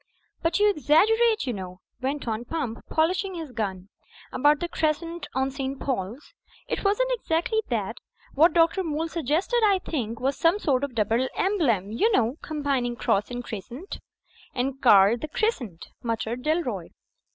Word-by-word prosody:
"But 330 0 +1
you 415 - +5
exaggerate, 425 - +3
you 250 - -1
know," 185 -2 -7 0.2
went 275 +1 -2
on 225 +1 -2
Pump, 250 -4 -3
polishing 365 +4 +1
his 320 -5 -6
gun, 200 -5 -4 0.4
"about 290 +2 +3
the 345 - -2
crescent 330 +1 -2
on 265 +1 +1
St. 270 0 -4
Paul's. 240 +1 -4 0.3
It - - -3
wasn't 420 +5 +2
exactly 440 0 0
that. 225 -1 -2 0.4
What 320 +5 +5
Dr. 335 +2 +3
Moole 320 0 -2
suggested, 335 - 0
I 405 -2 +5
think, 235 - -4
was 270 +2 0
some 335 +4 +3
sort 280 -9 +1
of 275 -4 -3
double 230 +4 +1
emblem, 250 - +1
you 420 - +2
know, 245 - +2
^combining 275 -6 -1
cross 200 -1 +1
and 245 0 -5
crescent." 240 - -7 0.6
"And 270 +2 -2
carled 210 0 +6
the 310 - -3
Crescent," 275 - -2
muttered 230 +1 -2
Dalroy. 255 - -1
280 Hz, 155 wpm, -26 LUFS, 235-335 Hz, 0.6 s, carled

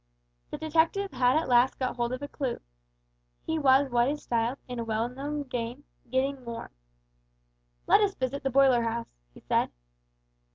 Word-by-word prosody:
The - - -5
detective 330 +5 +1
had 250 +3 +3
at 320 - 0
last 245 +1 +4
got 255 -1 -2
hold 240 0 -1
of 255 +2 -4
a - - -3
clew. 270 -4 -3 0.9
He 320 0 -1
was 270 -1 +4
what 240 0 +3
is 295 +1 -4
styled, 235 +2 0
in 250 -1 -5
a - - -1
well 225 +1 -1
known 285 +4 -4
game, 245 +1 -5 0.3
"getting 260 +1 0
warm." 235 -1 -7 1.1
"Let - - +5
us 400 -2 +1
visit 260 +2 -2
the 270 - -1
boiler 265 -2 +5
house," 230 0 -3 0.2
he - - -16
said. - - +1
260 Hz, 170 wpm, -28 LUFS, 240-285 Hz, 1.1 s, Let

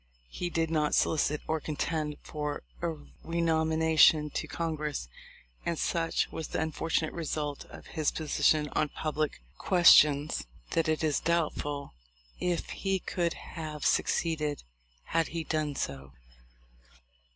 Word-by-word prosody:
He 175 - -3
did 165 -1 0
not 150 -2 +2
solicit 150 -1 +2
or 160 0 0
contend 155 0 -2
for 150 -1 -4 0.2
a 170 - 0 0.4
renomina 160 -1 +1
tion 150 -2 +7
to - - -3
Congress, 155 - -3 0.6
and 170 -1 -1
such 165 +1 0
was 160 - -4
the - - -3
unfortunate 160 0 -1
result 150 -3 -3
of - - -12
his 155 -3 0
position 155 -1 +2
on 150 +1 0
public 155 - -2 0.2
questions 155 -5 +5 0.2
that 165 -1 +1
it 155 0 0
is 155 -2 +2
doubtful 145 - -1 0.5
if 175 -1 -1
he 195 -1 0
could 175 -2 -1
have 155 -2 -6
succeeded 155 -4 +1 0.4
had 165 - 0
he 165 0 -4
done 155 -2 -1
so. 65 - -4
155 Hz, 130 wpm, -30 LUFS, 150-165 Hz, 0.6 s, tion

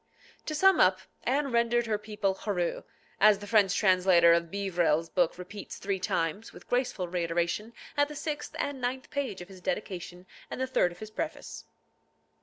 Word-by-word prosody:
To 310 - -2
sum 385 +4 +5
up, 185 0 +4 0.2
Anne 275 +2 +1
rendered 235 0 +2
her 215 -2 -1
people 210 -2 -1
hureux, 190 -3 -2 0.4
as 210 0 +6
the 205 - -9
French 200 -2 +3
translator 180 -3 +5
of 170 0 +1
Beeverell's 175 -4 0
book 175 -3 +1
repeats 195 +3 -8
three 195 -1 -2
times, 180 +4 -2
with - - -14
graceful 245 -7 -1
reiteration 170 +4 -1 0.2
at 290 -1 +3
the 300 - -9
sixth 300 +1 -4
and 280 -2 -3
ninth 255 +1 -3
page 260 -10 -3
of 175 - -9
his 190 -2 -13
dedication 180 -6 -4 0.2
and - - -6
the 260 - +1
third 255 -9 +2
of 175 - -12
his 215 +2 -9
preface. 315 +8 -5
200 Hz, 175 wpm, -29 LUFS, 180-240 Hz, 0.4 s, as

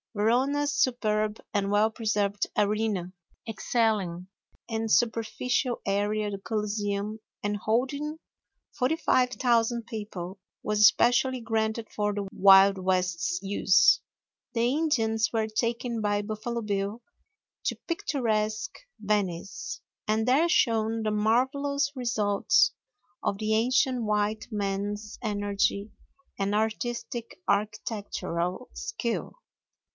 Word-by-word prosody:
Verona's 270 +7 +2
superb 215 -5 +1
and 200 -1 0
well 210 +2 +4
preserved 210 -3 0
Arena, 205 -3 0 0.3
excelling 210 -6 0 0.4
in 225 -1 -2
superficial 235 +3 +1
area 205 +1 0
the 200 -1 -5
Coliseum 210 0 -2 0.2
and 205 0 0
holding 265 +9 -1 0.6
45,000 250 -4 +1
people, 200 -5 -6 0.2
was 210 0 0
especially 245 +4 +5
granted 225 -1 -1
for 210 0 0
the 200 -1 -3
Wild 195 0 +7
West's 180 -2 0
use. 195 0 +4 0.5
The 240 +1 +2
Indians 225 -8 +1
were 220 -2 0
taken 230 +1 -1
by 205 0 0
Buffalo 220 +3 -4
Bill 205 +2 -2 0.6
to - - 0
picturesque 230 - -1 0.2
Venice, 195 -4 -2 0.3
and 220 +2 +1
there 295 +7 +4
shown 225 -7 +2
the 215 - 0
marvelous 270 +6 +1
results 215 -5 +2 0.5
of 200 - 0
the 215 +1 0
ancient 250 +2 +2
white 210 0 0
man's 205 +1 -3
energy 205 -1 -1 0.5
and 200 +1 0
artistic 235 - -3
architectural 205 -2 -2
skill. 440 - -3
215 Hz, 100 wpm, -27 LUFS, 205-240 Hz, 0.6 s, Wild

